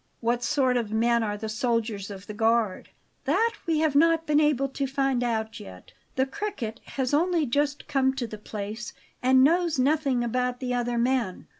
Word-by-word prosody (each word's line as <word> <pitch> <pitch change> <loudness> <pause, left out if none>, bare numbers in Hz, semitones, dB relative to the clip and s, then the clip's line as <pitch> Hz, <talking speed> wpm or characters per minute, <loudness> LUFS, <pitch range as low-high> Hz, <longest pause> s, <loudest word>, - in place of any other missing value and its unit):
"What 235 +1 0
sort 255 0 +2
of 225 -3 -2
men 235 +2 +2
are 210 -2 -2
the 220 +1 -5
soldiers 220 -3 -1
of 195 -1 -9
the 210 - -7
guard?" 225 -2 +1 0.4
"That 435 +11 +2
we 315 -2 +2
have 310 -3 +2
not 325 +2 +4
been 300 -1 +3
able 295 -3 +2
to 275 +1 -2
find 270 -2 0
out 220 -2 -2
yet; 90 -1 -12 0.2
the 260 - +2
Cricket 270 - -5 0.2
has 265 0 0
only 335 +1 +2
just 285 +3 -1
come 265 -2 +1
to 260 -3 -2
the 215 -2 -8
place, 215 +2 -6 0.3
and 260 +1 +5
knows 335 +2 +3
nothing 270 -2 +2
about 250 +1 -1
the 250 -1 -2
other 245 -1 -1
men." 240 -5 0
250 Hz, 185 wpm, -26 LUFS, 225-285 Hz, 0.4 s, and